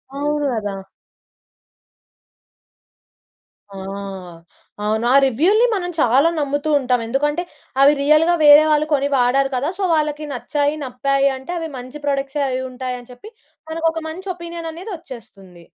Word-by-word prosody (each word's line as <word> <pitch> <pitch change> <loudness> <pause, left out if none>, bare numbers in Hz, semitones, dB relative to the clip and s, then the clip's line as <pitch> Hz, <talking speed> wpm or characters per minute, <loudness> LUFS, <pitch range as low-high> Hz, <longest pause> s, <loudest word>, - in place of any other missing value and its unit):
అవున 295 +1 -1
గదా! 205 -3 -3 3.0
ఆ! - - -8 1.1
అవును 220 +2 0
ఆ - - +5
రివ్యూ‌ల్ని 345 - +3
మనం 360 -4 -2
చాలా 270 +5 +4
నమ్ముతూ 290 +1 -1
ఉంటాం. 250 -2 +1
ఎందుకంటే 295 +7 0 0.4
అవి 285 +2 +7
రియల్‌గా 305 +4 +4
వేరే 295 +1 +9
వాళ్ళు 300 0 +3
కొని 280 0 +2
వాడారు 265 +2 +2
కదా! 265 +5 -1
సో, 400 - -3
వాళ్ళకి 300 0 -1
నచ్చాయి, 290 +3 -1
నప్పాయింటే 275 +3 -1
అవి 325 -1 -5
మంచి 255 +4 -9
ప్రొడక్ట్సే 275 0 -1
అవి 255 0 -2
ఉంటాయి 255 0 -5
అని 245 - -16
చెప్పి 250 - -12 0.4
మనకు 325 +1 -1
ఒక 325 0 -5
మంచి 370 +5 -7
ఒపీనియన్ 340 -1 -7
అనేది 360 +7 -8
ఓచ్చేస్తుంది. 195 - -13
285 Hz, 135 wpm, -20 LUFS, 255-315 Hz, 3.0 s, వేరే